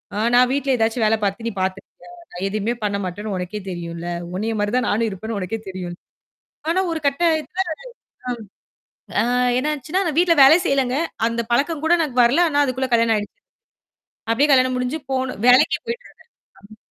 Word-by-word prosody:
ஆ - - -3 0.2
நான் 250 0 +5
வீட்ல 275 -1 0
ஏதாச்சும் 225 +1 0
வேல 220 +1 +3
பாத்து, 200 +4 -2
நீ 230 - -1
பாத்துருக்கியா? 190 - -5 0.2
நான் 180 +2 -7
எதையுமே 215 +3 -1
பண்ண 205 -1 0
மாட்டேன்னு 205 +3 -5
உனக்கே 180 +4 -5
தெரியும்ல. 170 -1 -6 0.3
உன்னைய 220 +3 -2
மாரி 205 0 0
தான் 255 - 0
நானும் 225 +2 +1
இருப்பேன்னு 215 +3 -5
உனக்கே 195 +5 -4
தெரியும். 180 -2 -6 0.7
ஆனா 360 +3 +2
ஒரு 325 - -2
கட்டத்துல 315 +2 0 1.6
ஆ - - +2 0.4
என்னாச்சுன்னா 300 +6 -1
நான் 310 -1 -2
வீட்ல 345 -2 +4
வேலை 305 +5 +8
செய்யலங்க. 270 -2 +1 0.3
அந்த 235 0 -1
பழக்கம் 295 +5 0
கூட 335 - +4
எனக்கு 290 -6 -2
வரல. 270 +9 +4
ஆனா 290 -1 +3
அதுக்குள்ள 260 0 -2
கல்யாணம் 230 -1 +3
ஆயிடுச்சு. 205 - -6 1.0
அப்டியே 285 +5 +2
கல்யாணம் 255 -1 +3
முடிஞ்சு 250 +5 -2
போணும் 260 -4 -2
வேலைக்கு 250 +1 +5
போயிட்டு 470 +1 -5
இருந்தேன். - - -24 0.5
ம். - - -17
245 Hz, 165 wpm, -21 LUFS, 210-285 Hz, 1.6 s, வேலை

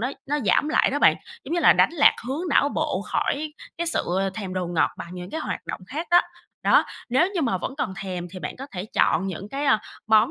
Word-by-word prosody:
nó 250 +4 -1 0.2
nó 295 +2 0
giảm 290 +10 +3
lại - - +3
đó - - -1
bạn. - - +5 0.3
Giống 335 - -3
như 345 - +1
là - - +7
đánh - - +4
lạc 290 -4 +5
hướng 315 +7 -3
não 285 - +4
bộ - - -1
khỏi 300 +1 -2 0.3
cái 340 - -1
sự 335 - 0 0.3
thèm 195 -4 -5
đồ 180 -1 -1
ngọt 170 -2 +1
bằng - - -7
những 180 +1 -7
cái 320 - -4
hoạt - - -5
động - - -5
khác 315 +8 -4
á. 350 - +7 0.4
Đó, - - +5 0.2
nếu 265 +10 +3
như 345 - 0
mà 190 -8 0
vẫn 265 - -4
còn 190 - -2
thèm 180 -2 -5
thì 185 - -8
bạn 150 - -6
có 270 +2 -7
thể 180 -1 -4
chọn 195 - +3
những 190 +2 -5
cái, 280 +4 -3
ơ, 220 -6 +4 0.3
món 220 +3 +5
250 Hz, 250 wpm, -24 LUFS, 185-300 Hz, 0.4 s, là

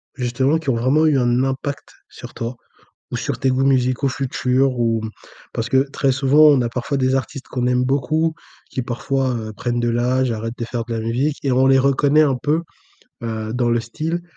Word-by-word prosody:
justement, 130 +3 +1
qui 160 -4 -4
ont 125 - +2
vraiment 130 +7 +2
eu 150 -3 +3
un 120 +1 +2
impact 135 +1 -3 0.2
sur - - -11
toi 115 +2 -5 0.6
ou - - -1
sur - - -3
tes 135 - +1
goûts 130 +1 +1
musicaux 130 0 +2
futurs 130 -1 0
ou? 115 -2 +1 0.5
Parce 115 - -3
que 130 - +3
très 140 -1 +1
souvent, 135 +3 +3
on 145 -3 +6
a 120 - -1
parfois 130 +4 -3
des 130 0 +1
artistes 135 +1 -5
qu'on 125 -1 -2
aime 125 0 +2
beaucoup, 155 +5 0 0.4
qui 130 - -3
parfois, 130 +2 -1
heu, 110 -1 -5
prennent 120 +2 -2
de 120 - 0
l'âge, 125 +2 +1
arrêtent 115 +2 -5
de 115 - -2
faire 115 0 -4
de 115 0 -5
la 115 - -2
musique 125 +7 -1
et 140 - 0
on 130 +1 +3
les 135 0 +5
reconnaît 140 +3 +3
un 140 -4 +2
peu, 150 +5 +1 0.6
heu, 110 -1 -4
dans 120 0 0
le 120 0 +2
style 155 +9 -4
130 Hz, 210 wpm, -20 LUFS, 120-140 Hz, 0.6 s, on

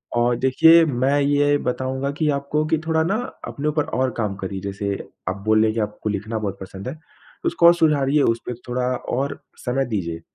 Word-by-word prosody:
अ, 120 +1 +3
देखिए, 160 +6 +6
मैं 135 0 +1
ये 145 +1 +3
बताऊँगा 130 +2 -2
कि 155 - +1
आपको 140 +2 -1
कि 160 +1 +1
थोड़ा 160 -1 +2
ना 190 +6 0 0.3
अपने 145 +2 -4
ऊपर 150 0 +1 0.2
और 130 0 +1
काम 105 -4 -1
करिए 95 0 -5
जैसे, 100 +1 -3 0.4
आप 95 - -3
बोल 110 0 +4
रही 110 - +4
हैं - - -1
कि - - 0
आपको 105 0 -3
लिखना 110 +2 -3
बहुत 100 -2 -3
पसंद 95 +2 -8
है। 130 - -3
तो 155 -1 -11
उसको 170 - +2
और 170 - +8
सुधारिए, 150 -3 +3
उसपे 115 -1 0
थोड़ा 125 +1 -1 0.3
और 140 +2 -2 0.3
समय 135 +2 0
दीजिए। 85 -8 -3
130 Hz, 205 wpm, -22 LUFS, 110-145 Hz, 0.4 s, और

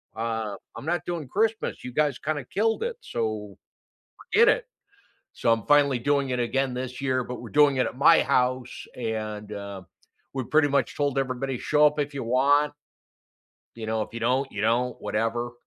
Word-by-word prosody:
uh, 110 -2 -2 0.2
I'm - - -8
not 175 0 -1
doing 170 -5 -4
Christmas, 220 - -1
you 125 - -6
guys 145 -3 +1
kinda 150 -2 -2
killed 225 - 0
it, 470 -1 -3
so 110 -3 -3 0.8
forget 465 +3 +7
it." - - +2 0.7
So, 115 - +1
I'm 115 -2 +1
finally 145 -3 +5
doing 140 +1 +1
it 125 - -1
again 130 +2 0
this 130 +1 -5
year, 130 -2 0
but 125 +1 -7
we're 120 - -9
doing 145 -2 +4
it 130 - +2
at - - -7
my 155 +4 +6
house 125 0 0
and, 110 -3 -4
uh, 100 -2 -6 0.5
we 130 -2 -2
pretty 155 -1 +3
much 140 -1 +1
told 140 -2 0
everybody, 130 0 -2
"Show 150 +3 +4
up 150 0 -2
if 145 0 -1
you 135 - -4
want" 140 +5 +3 1.1
you 115 - -6
know, 110 0 0
"If - - -8
you 115 - -6
don't, 130 +4 +1
you 105 - -4
don't, 120 +2 +1
whatever." 115 +3 -1
130 Hz, 185 wpm, -26 LUFS, 115-145 Hz, 1.1 s, forget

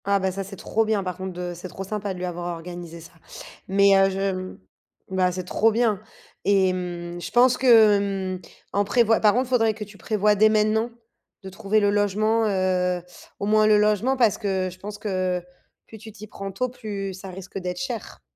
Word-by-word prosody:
Ah 200 0 +3
bah 190 0 0
ça, 195 +1 -4
c'est 195 +1 -9
trop 225 +4 0
bien 215 -2 0
par 180 -1 -4
contre 190 +1 -6
de 180 0 -5
c'est 175 +2 -8
trop 185 +2 -7
sympa 205 0 -4
de - - -9
lui 180 - -3
avoir 175 0 -4
organisé 170 0 -8
ça. 170 - -13 0.6
Mais, 200 +1 +5
heu, 195 0 +5
je 190 -1 -3 0.6
bah, 185 -1 +2
c'est 185 +1 -4
trop 220 +5 +2
bien. 220 -3 +1 0.4
Et 195 -2 +3
mmh, 175 -1 -5
je - - -6
pense 250 +1 +5
que, 225 -5 +6 0.4
hem, - - -16 0.3
en 200 - +2
prévoi 225 +2 +3
par 210 -1 +4
contre, 255 +1 0
faudrait 225 -4 +2
que 215 - -6
tu 205 0 -13
prévois 210 +3 +2
dès 215 +2 +5
maintenant, 215 +2 +2 0.5
de 190 - -7
trouver 200 +3 0
le 205 -1 +2
logement, 210 +2 +1
heu, 185 -2 0 0.4
au - - -2
moins 215 +1 +4
le 215 -1 +5
logement, 210 +5 +2
parce 230 -5 +3
que, 190 -3 -1
je 185 - -15
pense 205 +2 -7
que 185 -4 -2 0.4
plus 220 - -13
tu 220 +1 -11
t'y 215 0 -11
prends 195 -1 -7
tôt, 255 +6 -2
plus 205 -5 -5
ça 190 +1 -9
risque 190 +1 -8
d'être 180 -1 -4
cher. 245 -5 -6
200 Hz, 210 wpm, -24 LUFS, 185-215 Hz, 0.6 s, que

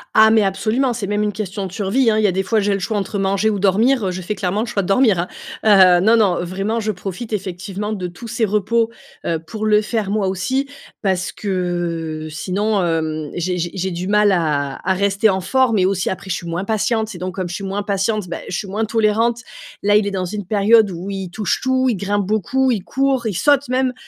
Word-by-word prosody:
Ah 220 0 +7
mais 220 -1 +5
absolument! 225 +6 0
C'est 220 -3 -4
même 205 +1 -1
une 210 0 0
question 195 -1 -4
de - - -12
survie, 220 +5 +1
hein, 215 - +2
il 215 - +2
y - - +5
a - - +2
des 190 +2 0
fois 220 +3 +1
j'ai 205 0 +1
le 195 - -1
choix 215 +3 -2
entre 200 +1 -2
manger 195 +2 +1
ou 200 - -2
dormir, 215 +4 +3
heu, - - -1
je 185 +1 -5
fais 210 - -2
clairement 195 +2 -1
le - - -1
choix 205 -3 -1
de 180 - -5
dormir, 200 -3 +3
hein. 175 - -1 0.4
Heu, 185 -4 +7
non, 225 +2 +5
non, 185 -5 +2
vraiment, 195 +6 -2
je 215 0 -1
profite 195 +4 -6
effectivement 195 +1 -4
de 185 -3 -3
tous 175 +7 -10
ses 225 0 0
repos, 215 +3 +1 0.4
heu, 165 - 0
pour 215 +5 -4
le 210 0 +4
faire 215 -3 -2
moi 205 -2 0
aussi, 255 +10 -1 0.4
parce 190 -2 0
que 175 -5 -3
sinon, 200 +4 -1
hem, 155 -3 -1
j'ai 180 +1 -1
j'ai 175 +1 -1
j'ai 190 0 -2
du 175 +2 -4
mal 210 0 +4
à 150 -6 0
à 190 +1 +2
rester 200 +2 +2
en 190 -1 0
forme 255 +1 +2
et 185 - +3
aussi 190 -1 0
après 190 0 -5
je - - 0
suis 170 - -8
moins 170 +3 -2
patiente 220 0 0
et 175 - -9
donc 185 0 -4
comme 185 -2 -3
je 175 - -6
suis 200 - -6
moins 200 +1 -3
patiente, 200 0 -1
bah, - - -3
je 175 - -2
suis 200 - -4
moins 215 +3 -1
tolérante. 225 +2 +1 0.4
Là 205 0 +4
il 210 -1 +3
est - - -2
dans 185 -2 -2
une 205 +1 -5
période 215 +1 +4
où 180 +3 -6
il 190 -2 -4
touche 210 +2 -1
tout, 260 0 +1
il 235 - +2
grimpe 200 +1 -1
beaucoup, 250 +6 +1
il 205 -6 -1
court, 265 -2 0
il 200 - -2
saute 285 - +3
même. 255 0 +1
200 Hz, 245 wpm, -19 LUFS, 185-220 Hz, 0.4 s, Ah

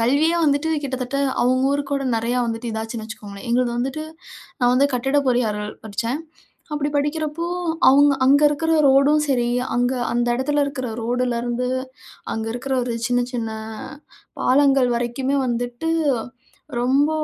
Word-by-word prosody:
கல்வியே 290 +8 +3
வந்துட்டு 290 +1 +2 0.2
கிட்டத்தட்ட 260 0 -3 0.3
அவங்க 255 +1 +2
ஊருக்கு 285 -1 -2
கூட 275 -1 -1
நிறையா 235 +2 0
வந்துட்டு 230 +1 -4
இதாச்சுன்னு 220 0 -4
வச்சுக்கோங்களேன். 205 -2 -9
எங்கள்து 245 0 +2
வந்துட்டு 270 +5 -2 0.6
நா 245 - +3
வந்து 275 +2 +4
கட்டிடப் 270 +3 +1
பொறியாளர் 215 -4 0
படிச்சேன். 230 +7 -3 0.5
அப்படி 295 0 -1
படிக்கிறப்போ, 305 +3 -1 0.4
அவங்க 285 +1 +6
அங்க 280 +3 +5
இருக்கிற 320 +3 -1 0.2
ரோடும் 280 +3 +4
சரி, 245 -3 +1 0.3
அங்க 245 +1 +1 0.2
அந்த 240 0 +1
இடத்தில 290 +3 0
இருக்கிற 265 -3 -4
ரோடுலேருந்து 245 +1 -1 0.7
அங்கே 225 0 -3
இருக்கிற 265 +2 -3
ஒரு 240 -1 -3
சின்ன 245 0 +2
சின்ன 230 -2 -2 0.9
பாலங்கள் 270 -1 +4
வரைக்குமே 245 +3 -1
வந்துட்டு, 245 +5 -2 0.9
ரொம்ப 275 +4 +3
255 Hz, 130 wpm, -22 LUFS, 240-280 Hz, 0.9 s, அவங்க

